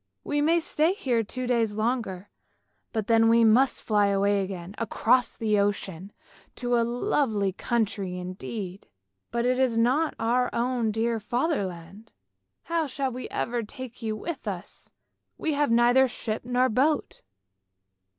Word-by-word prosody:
We 290 Hz, 0 st, 0 dB
may 330 Hz, +3 st, +3 dB
stay 325 Hz, +1 st, +1 dB
here 255 Hz, -, 0 dB
two 255 Hz, +4 st, -5 dB
days 230 Hz, -4 st, 0 dB
longer, 215 Hz, -5 st, -2 dB, 0.6 s
and 220 Hz, -3 st, -2 dB
then 225 Hz, +1 st, +4 dB
we 230 Hz, 0 st, +5 dB
must 240 Hz, +5 st, +4 dB
fly 210 Hz, -2 st, +3 dB
away 200 Hz, 0 st, +2 dB
again 185 Hz, -1 st, -6 dB
across 235 Hz, +1 st, +2 dB
the 215 Hz, -2 st, +1 dB
ocean, 200 Hz, -2 st, -2 dB, 0.4 s
to 245 Hz, -1 st, 0 dB
a 235 Hz, -, +3 dB
lovely 230 Hz, -4 st, 0 dB
country 200 Hz, -4 st, -1 dB
indeed, 185 Hz, +1 st, -6 dB, 0.4 s
but 235 Hz, 0 st, -1 dB
it 250 Hz, +1 st, +2 dB
is 255 Hz, -3 st, +2 dB
not 260 Hz, +8 st, +2 dB
our 245 Hz, +2 st, +1 dB
own 240 Hz, -1 st, 0 dB
dear 225 Hz, +1 st, 0 dB
Fatherland! 210 Hz, -, -3 dB, 0.5 s
How 330 Hz, -2 st, -1 dB
shall 270 Hz, 0 st, -2 dB
we 255 Hz, +1 st, -6 dB
ever 240 Hz, 0 st, -2 dB
take 250 Hz, +3 st, -9 dB
you 220 Hz, -1 st, -2 dB
with 285 Hz, +2 st, -6 dB
us, 190 Hz, -1 st, -7 dB, 0.5 s
we 315 Hz, -, -1 dB
have 290 Hz, -1 st, +1 dB
neither 240 Hz, +3 st, +5 dB
ship 225 Hz, -3 st, -4 dB
nor 250 Hz, +1 st, +2 dB
boat! 280 Hz, +6 st, 0 dB
230 Hz, 145 wpm, -26 LUFS, 205-255 Hz, 0.6 s, we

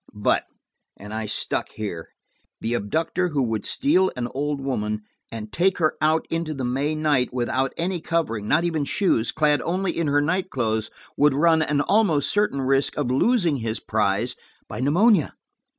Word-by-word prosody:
But–and 105 Hz, 0 st, -4 dB
I 110 Hz, 0 st, -3 dB
stuck 105 Hz, -, -2 dB
here–the 105 Hz, +3 st, -7 dB
abductor 160 Hz, -, -1 dB
who 145 Hz, -4 st, 0 dB
would 110 Hz, -4 st, -2 dB
steal 190 Hz, -9 st, +2 dB
an 120 Hz, -1 st, -2 dB
old 145 Hz, +1 st, -2 dB
woman, 105 Hz, -6 st, -2 dB, 0.3 s
and 110 Hz, -1 st, -7 dB
take 190 Hz, +2 st, +2 dB
her 155 Hz, -3 st, +2 dB
out 155 Hz, +1 st, +2 dB
into 165 Hz, -2 st, -2 dB
the 130 Hz, -2 st, -3 dB
May 140 Hz, +5 st, -1 dB
night 150 Hz, -5 st, +1 dB
without 130 Hz, +2 st, -1 dB
any 175 Hz, 0 st, -2 dB
covering–not 155 Hz, -4 st, 0 dB
even 160 Hz, -4 st, 0 dB
shoes–clad 150 Hz, -, +1 dB
only 185 Hz, +3 st, -1 dB
in 165 Hz, -2 st, -1 dB
her 145 Hz, 0 st, +3 dB
night 180 Hz, +6 st, 0 dB
clothes, 110 Hz, -, -1 dB, 0.3 s
would 145 Hz, -1 st, +4 dB
run 160 Hz, +2 st, +4 dB
an 150 Hz, -2 st, +1 dB
almost 195 Hz, -7 st, +2 dB
certain 205 Hz, -9 st, +1 dB
risk 135 Hz, +1 st, +1 dB
of 140 Hz, -4 st, -1 dB
losing 170 Hz, -, +2 dB
his 115 Hz, -3 st, -3 dB
prize -, -, 0 dB, 0.3 s
by -, -, -7 dB
pneumonia. 175 Hz, -, +3 dB
145 Hz, 155 wpm, -23 LUFS, 120-165 Hz, 0.3 s, would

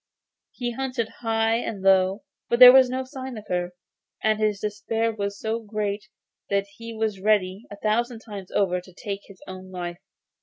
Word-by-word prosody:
He 245 Hz, -1 st, -4 dB
hunted 255 Hz, -2 st, -2 dB
high 225 Hz, -1 st, +1 dB
and 215 Hz, -4 st, -4 dB
low, 190 Hz, +1 st, +4 dB, 0.3 s
but 235 Hz, -, +2 dB
there 250 Hz, 0 st, +12 dB
was 260 Hz, -1 st, +7 dB
no 260 Hz, +1 st, -2 dB
sign 260 Hz, -2 st, -7 dB
of 215 Hz, -, -9 dB
her, 180 Hz, 0 st, -2 dB, 0.5 s
and 215 Hz, 0 st, +2 dB
his 210 Hz, -2 st, +1 dB
despair 220 Hz, +2 st, -1 dB
was 200 Hz, -1 st, -4 dB
so 220 Hz, +1 st, -1 dB
great 205 Hz, -2 st, -3 dB, 0.4 s
that 200 Hz, 0 st, +1 dB
he 230 Hz, 0 st, -7 dB
was 220 Hz, -3 st, -2 dB
ready, 200 Hz, 0 st, +1 dB
a 205 Hz, -, -8 dB
thousand 230 Hz, +3 st, 0 dB
times 200 Hz, -5 st, -8 dB
over, 180 Hz, -2 st, +1 dB
to 185 Hz, 0 st, -17 dB
take 200 Hz, +2 st, -5 dB
his 200 Hz, -2 st, -15 dB
own 185 Hz, 0 st, -9 dB
life. 175 Hz, -1 st, -5 dB
215 Hz, 180 wpm, -25 LUFS, 195-230 Hz, 0.5 s, there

